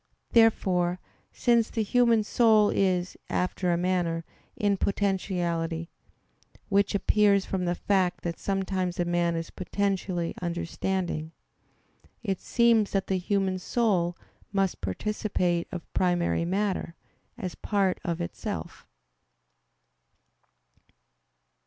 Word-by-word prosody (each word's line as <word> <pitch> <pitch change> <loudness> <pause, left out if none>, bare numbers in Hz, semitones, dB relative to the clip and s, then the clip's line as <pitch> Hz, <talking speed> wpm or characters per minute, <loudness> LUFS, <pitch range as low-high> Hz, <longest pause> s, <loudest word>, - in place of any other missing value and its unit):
Therefore, 185 -6 +3 0.3
since 235 -2 +2
the 225 - -1
human 235 0 +3
soul 215 -2 +4
is, 185 -2 +1
after 180 0 0
a 170 - +2
manner, 175 -2 0 0.3
in 205 -1 +1
potentiality; 175 -4 -1 0.8
which 200 0 +2
appears 200 -1 +3
from 185 -2 -2
the 175 0 0
fact 185 -1 0
that 170 -1 -3
sometimes 190 -2 -1
a 175 - +2
man 175 -1 +1
is 165 0 -4
potentially 185 -2 -2
understanding; 175 -1 -2 0.9
it 195 -4 -2
seems 230 -3 +3
that 195 -1 +1
the 190 -1 0
human 190 0 0
soul 185 -5 +1 0.3
must 195 -2 0
participate 175 - -1
of 175 -2 -5
primary 175 -2 +1
matter, 190 -2 -1 0.4
as 185 -7 -4
part 195 -3 0
of 170 -1 -2
itself. 85 - -5
185 Hz, 105 wpm, -27 LUFS, 175-200 Hz, 0.9 s, soul